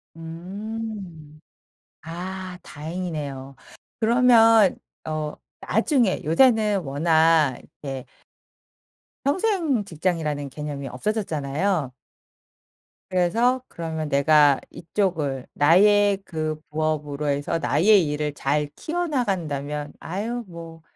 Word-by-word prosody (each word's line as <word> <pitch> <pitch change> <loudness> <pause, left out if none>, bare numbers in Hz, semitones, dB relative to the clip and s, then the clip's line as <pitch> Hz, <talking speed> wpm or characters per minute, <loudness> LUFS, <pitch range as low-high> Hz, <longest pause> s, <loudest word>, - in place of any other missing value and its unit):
음. 180 -1 -7 0.6
아 180 +3 -6
다행이네요. 150 -4 -6 0.4
그러면 225 -3 +5 0.3
어 155 -1 -3 0.3
나중에 245 - +1
요새는 215 - +4
워낙 155 -1 +3
이렇게 135 -3 -8 1.2
평생 320 - +1
직장이라는 155 -5 -2
개념이 145 -1 -6
없어졌잖아요. 160 - -1 1.2
그래서 225 +8 +2
그러면 160 -2 -5
내가 145 0 +5
이쪽을 160 -8 -2
나의 200 +6 +5
그 155 -2 -3
부업으로 150 -1 -2
해서 145 +3 0
나의 180 +3 +4
일을 150 0 -2
잘 145 +1 -1
키워 350 +2 -2
나간다면 150 - -2
"아유 225 +7 -4
뭐 165 -1 -10
165 Hz, 205 characters per minute, -24 LUFS, 150-205 Hz, 1.2 s, 그러면